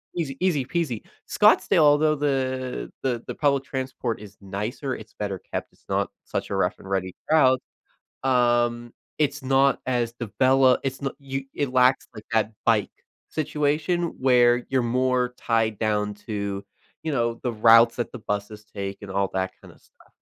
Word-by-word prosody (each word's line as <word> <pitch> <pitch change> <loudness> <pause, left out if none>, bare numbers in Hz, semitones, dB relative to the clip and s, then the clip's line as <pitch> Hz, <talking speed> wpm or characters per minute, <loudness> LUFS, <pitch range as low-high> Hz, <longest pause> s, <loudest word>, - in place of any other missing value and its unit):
easy 145 -6 -3
easy 170 -8 +1
peasy. 145 -7 -2 0.2
Scottsdale, - - +4
although 150 +1 +4
the 130 -3 -2
the 120 -3 -1
the - - -5
public 140 -3 +2
transport 130 -3 -4
is 100 -1 -12
nicer, 105 +8 -4
it's 110 0 -12
better 100 -3 -4
kept, - - -3
it's - - -30
not - - 0 0.2
such - - -3
a - - 0
rough - - 0
and 95 - -11
ready 95 -1 -1 0.2
route, 130 -5 +5 0.6
um, 120 -2 +2 0.3
it's 150 -3 0
not 135 +1 +3
as 120 -2 0
develop 130 +3 +3
it's 135 0 -3
not 135 - -2
you 135 -1 -5
it 140 -3 -2
lacks, 130 +1 +4
like, 110 -1 -10
that 110 -1 +1
bike 110 -3 +2 0.4
situation 155 +3 0
where 120 -2 +4
you're 130 -2 +1
more 125 +1 +1
tied 110 -2 0
down 105 -1 0
to, 100 -1 -4 0.4
you 160 - -1
know, 120 -3 +1
the 125 - 0
routes 115 +1 +6
that 120 - -2
the 125 - -7
buses 105 0 -4
take 100 -2 -6
and 100 - -8
all 100 0 0
that 95 0 -1
kind - - -13
of - - -24
stuff. - - -26
125 Hz, 170 wpm, -25 LUFS, 110-135 Hz, 0.6 s, routes